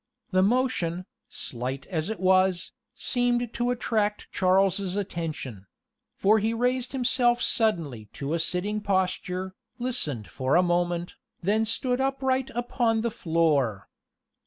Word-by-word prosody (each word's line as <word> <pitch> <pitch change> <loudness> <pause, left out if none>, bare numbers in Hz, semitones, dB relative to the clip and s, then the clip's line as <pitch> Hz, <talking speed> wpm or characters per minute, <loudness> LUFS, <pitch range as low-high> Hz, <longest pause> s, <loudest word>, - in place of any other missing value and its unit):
The 185 -1 +4
motion, 190 -6 +1 0.2
slight 130 +2 -5
as 165 0 -2
it 220 - -4
was, 185 -1 +3 0.2
seemed 245 -1 0
to 240 0 0
attract 215 -4 -1
Charles's 190 0 +2
attention; 155 - -4 0.5
for 215 +3 +4
he 220 +2 0
raised 250 +1 0
himself 245 -2 +2
suddenly 165 - 0
to 140 +2 -3
a 170 - +1
sitting 200 +6 0
posture, 185 -1 -1 0.2
listened 160 - 0
for 130 0 0
a 180 - +5
moment, 175 0 0 0.2
and 180 - -2
then 220 +2 +3
stood 250 +3 0
upright 265 -1 0
upon 240 -2 +1
the 235 0 -1
floor. 155 - +1
195 Hz, 130 wpm, -27 LUFS, 170-240 Hz, 0.5 s, a